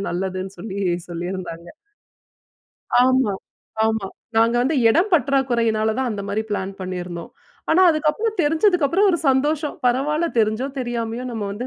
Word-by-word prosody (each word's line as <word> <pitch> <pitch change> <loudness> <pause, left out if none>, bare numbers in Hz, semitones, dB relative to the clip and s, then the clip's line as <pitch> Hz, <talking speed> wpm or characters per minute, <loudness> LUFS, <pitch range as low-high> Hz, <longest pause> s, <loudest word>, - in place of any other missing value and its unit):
நல்லதுன்னு 185 +1 -4
சொல்லி, 200 -3 -6 0.3
சொல்லியிருந்தாங்க. 175 -1 -6 1.3
ஆமா. 260 -4 +3 0.5
ஆமா. 220 -3 0 0.3
நாங்க 230 +1 +4
வந்து 280 +5 +1
எடம் 340 - +3
பற்றாக்குறையினாலதான், 245 -5 +1
அந்த 205 -2 -4
மாரி 205 +2 -1
பிளான் 195 -1 -2
பண்ணியிருந்தோம். 180 -2 -5 0.4
ஆனா, 360 +4 +5
அதுக்கப்புறம், 320 +9 0
தெரிஞ்சதுக்கப்புறம், 340 +3 +3
ஒரு 340 - 0
சந்தோஷம். 290 +3 +1
பரவால்ல, 300 +7 +1
தெரிஞ்சோ 220 +3 +1
தெரியாமயோ, 240 -1 -3
நம்ம 220 -4 -4
வந்து 235 +5 -5
235 Hz, 120 wpm, -21 LUFS, 200-295 Hz, 1.3 s, ஆனா